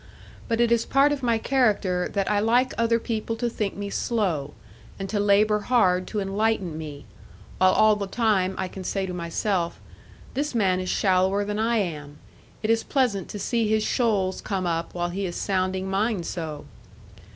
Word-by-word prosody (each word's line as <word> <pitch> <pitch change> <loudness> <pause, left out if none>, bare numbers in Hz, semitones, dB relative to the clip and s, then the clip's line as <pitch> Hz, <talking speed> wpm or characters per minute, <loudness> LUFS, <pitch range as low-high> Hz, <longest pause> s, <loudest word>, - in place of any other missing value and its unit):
But 230 -1 0
it 235 -1 +3
is 235 -1 +3
part 275 +2 +3
of 290 -2 -2
my 235 -2 +2
character 215 -8 +1
that 200 -2 0
I 210 -1 +2
like 240 +5 +2
other 230 0 +2
people 225 -1 -3
to 240 +1 -1
think 215 -4 -3
me 200 0 -5
slow, 175 -14 -1 0.4
and 195 - -4
to 210 - -1
labour 210 +1 +3
hard 190 -6 +2
to 215 - -3
enlighten 195 -3 0
me, 150 -3 -7 0.5
while 185 0 +6
all 215 0 +5
the 200 -1 -4
time 195 -4 +1
I 190 - -2
can 190 +1 -8
say 195 +1 -1
to 180 - -5
myself, 170 +1 -2 0.5
'This 285 0 -2
man 190 -5 +2
is 185 0 -3
shallower 190 +1 +2
than 210 +1 -3
I 230 +1 +2
am; 150 -7 -3 0.5
it 215 - +2
is 225 0 +2
pleasant 240 - 0
to - - -6
see 230 +1 0
his 215 0 +2
shoals 205 -7 0
come 190 -3 -2
up 165 0 -2
while 175 0 -1
he 190 +2 -3
is 175 - -6
sounding 190 -1 -1
mine 195 0 0
so!' 160 -4 -5
200 Hz, 185 wpm, -25 LUFS, 185-225 Hz, 0.5 s, while